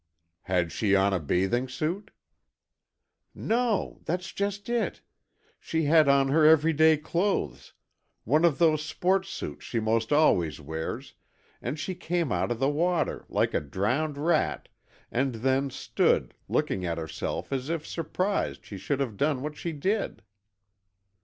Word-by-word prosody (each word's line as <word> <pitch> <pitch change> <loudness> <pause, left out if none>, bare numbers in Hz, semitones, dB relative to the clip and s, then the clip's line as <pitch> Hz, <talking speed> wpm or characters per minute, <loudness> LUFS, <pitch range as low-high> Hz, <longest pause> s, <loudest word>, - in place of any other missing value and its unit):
"Had 90 -3 0
she 100 +4 +2
on 100 0 +3
a 95 - +1
bathing 95 - 0
suit?" 170 +10 -3 1.3
"No, 230 -2 0
that's 180 +2 -2
just 200 0 -3
it. 235 -1 -1 0.6
She 160 0 -1
had 155 -1 +5
on 140 -1 +4
her 155 +3 +4
everyday 160 0 +5
clothes, 170 - -2 0.5
one 150 +8 +2
of 170 -5 +4
those 155 -3 +3
sports 190 +4 0
suits 190 - -6
she 115 - -2
'most 110 +2 0
always 90 - +3
wears, 80 +2 -5 0.5
and 125 +6 -3
she 185 +5 -3
came 170 -5 -2
out - - 0
of 120 - -1
the 135 +3 +1
water, 170 +4 0
like - - +1
a - - +1
drowned 125 - -1
rat, 155 +2 0 0.4
and 130 0 0
then 135 +4 +1
stood, - - +1 0.2
looking 95 - 0
at 85 -2 -2
herself 80 - -4
as 135 +2 -2
if 165 -2 -2
surprised 185 +4 -2
she 100 - -8
should 130 +9 -2
have 115 -7 -3
done 140 -1 0
what 150 0 -4
she 170 - -4
did." 190 - -2
145 Hz, 145 wpm, -27 LUFS, 115-170 Hz, 1.3 s, had